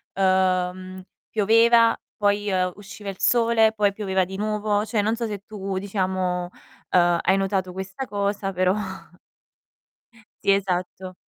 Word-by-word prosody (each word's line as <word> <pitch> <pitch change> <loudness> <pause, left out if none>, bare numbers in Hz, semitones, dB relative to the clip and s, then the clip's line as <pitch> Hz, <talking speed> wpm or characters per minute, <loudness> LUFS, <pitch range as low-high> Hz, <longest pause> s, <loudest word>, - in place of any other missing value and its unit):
uhm, 185 -1 0 0.3
pioveva, 230 +2 +4 0.2
poi, 205 0 +1
ehm, 185 -2 0
usciva 205 0 -11
il 195 - -8
sole, 230 -2 +3
poi 205 -2 +1
pioveva 190 -3 0
di 190 +2 -8
nuovo. 210 0 0
Cioè 220 -1 0
non 220 +2 0
so 230 0 -3
se 205 -2 -6
tu, 195 -2 -5
diciamo, 185 -2 -2 0.4
uhm, 175 -1 +4
hai 190 - +2
notato 195 -1 -1
questa 190 +8 -6
cosa, 200 -1 -2
però 185 +1 +2 1.7
Sì, - - +4
esatto. 185 -1 -2
195 Hz, 135 wpm, -23 LUFS, 185-210 Hz, 1.7 s, pioveva